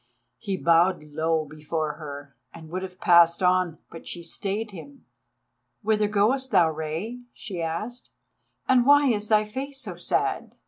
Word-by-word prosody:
He 200 -4 -3
bowed 170 0 +3
low 160 +1 -1
before 155 +1 -3
her 145 -2 -9 0.2
and 160 -1 -12
would 185 +1 -3
have 185 -1 -8
passed 170 +1 +5
on, 180 -2 +2
but 165 - -11
she 175 - -6
stayed 200 +5 -3
him. 270 - -12 0.8
"Whither 210 0 +2
goest 220 +6 +1
thou, 175 -7 +4
Rei?" 160 +10 -4 0.2
she 190 -7 -6
asked, 210 +10 -4 0.6
"and 255 -1 +4
why 285 -1 +6
is 210 -3 0
thy 215 -1 +3
face 270 +5 -5
so - - -5
sad?" - - -1
185 Hz, 150 wpm, -25 LUFS, 160-220 Hz, 0.8 s, why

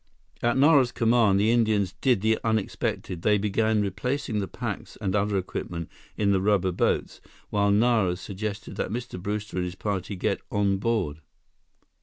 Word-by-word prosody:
At 120 +1 +2
Nara's 140 -3 +5
command, 115 -4 +3
the 110 +3 +3
Indians 110 -5 +2
did 125 -7 +3
the 110 +1 +2
unexpected. 110 -5 -2
They 105 +2 +3
began 105 +1 +1
replacing 115 +4 -2
the 100 - -2
packs - - -6
and 100 -1 -1
other 100 0 +1
equipment 85 -2 -4 0.3
in 100 -2 +2
the 95 -1 +2
rubber 95 -2 +2
boats, 90 - -1 0.3
while 100 -1 +2
Nara 105 -3 +3
suggested 105 +3 -6
that - - -2
Mr. 115 -4 -5
Brewster 105 0 -4
and 90 - +1
his 90 +1 -5
party 100 0 -3
get 90 - -1
on 100 -1 +1
board. 95 -9 -1
105 Hz, 160 wpm, -26 LUFS, 95-110 Hz, 0.3 s, Nara's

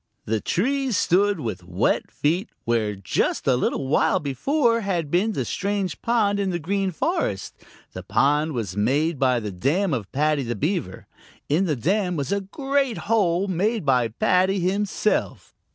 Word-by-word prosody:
The 110 -1 -1
trees 265 +3 0
stood 200 +1 +2
with 110 -9 -4
wet 90 +1 0
feet 175 +9 -1 0.2
where 110 -3 0
just 95 -1 -1
a 130 - +4
little 130 +2 -1
while 135 - +2
before 230 - +1
had 175 -7 -2
been 205 +6 +2
the - - -2
strange 200 -2 -2
pond 215 -4 +1
in 195 -1 0
the 175 - -1
Green 195 +4 -1
Forest, 325 - -2 0.4
the - - -6
pond 150 +2 +1 0.2
made 145 +8 +1
by 130 -2 +3
the 105 -2 -5
dam 150 - 0
of 110 -7 -3
Paddy 150 +1 +1
the 120 -2 -3
Beaver. 150 - -2 0.4
In 165 +7 +2
the 155 -5 0
dam 180 - 0
was 140 -4 -3
a 200 0 +1
great 270 +4 -1
hole 200 -4 +1
made 200 +2 0
by 125 -4 +3
Paddy 185 - +2
himself. 200 +3 -1
175 Hz, 160 wpm, -23 LUFS, 135-200 Hz, 0.4 s, a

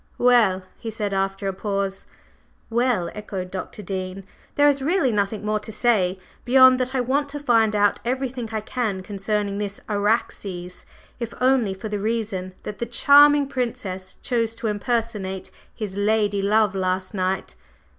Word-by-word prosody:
"Well?" 230 -7 +4 0.2
he 225 - -5
said 210 -2 -3
after 195 +1 -1
a 195 - -1
pause. 195 0 -2 0.6
"Well," 235 -7 +1
echoed 195 -3 -6
Dr. 195 +2 -6
Dean. 190 0 -4 0.3
"There 290 0 +5
is 280 -1 +3
really 290 -2 +2
nothing 210 0 -1
more 215 0 +1
to 210 - -8
say 205 -5 +2 0.3
beyond 260 0 +6
that 255 +1 -1
I 255 - +2
want 280 +4 0
to 290 +1 -4
find 225 -6 +3
out 205 0 +3
everything 250 -1 -2
I 220 -1 -2
can 215 -5 -2
concerning 200 +1 -2
this 205 -1 -4
Araxes, 200 -4 -2 0.3
if 235 -1 -5
only 250 -6 +2
for 205 +3 -6
the 210 -1 -3
reason 205 -4 -2
that 205 -1 -7
the 235 - -2
charming 285 +4 +6
Princess 200 -8 -4
chose 230 -3 0
to 230 - -7
impersonate 210 -3 -2 0.2
his 210 -4 -6
lady 205 0 +1
love 210 0 +3
last 185 0 -1
night. 190 -1 -2
210 Hz, 155 wpm, -23 LUFS, 195-240 Hz, 0.6 s, beyond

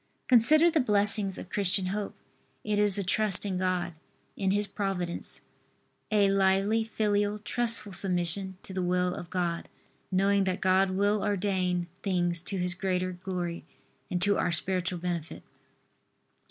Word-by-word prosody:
Consider 305 +8 +6
the 320 - +2
blessings 205 -4 +3
of 185 - -9
Christian 195 -1 +1
hope. 205 -1 -4 0.5
It 210 -1 0
is 205 -1 +3
a 200 - 0
trust 205 +1 +1
in 190 -2 -2
God, 185 -2 -1 0.4
in 195 -1 -1
His 205 +2 +1
Providence, 195 -4 -3 0.7
a 205 -2 +4
lively, 195 +3 +2
filial, 210 -2 0
trustful 225 -1 -2
submission 185 0 0
to 190 - -8
the 185 - -2
will 180 0 +1
of 175 - -8
God, 175 -2 -2 0.4
knowing 195 +1 +2
that 185 -1 -1
God 190 +1 +3
will 200 +2 +1
ordain 185 -3 0 0.2
things 175 -3 0
to 195 +2 -4
His 180 -1 0
greater 185 0 -1
glory 180 -2 -4 0.5
and 180 - -1
to 205 0 +2
our 175 - +1
spiritual 180 +2 -1
benefit. 170 -2 -4
190 Hz, 145 wpm, -28 LUFS, 180-205 Hz, 0.7 s, Consider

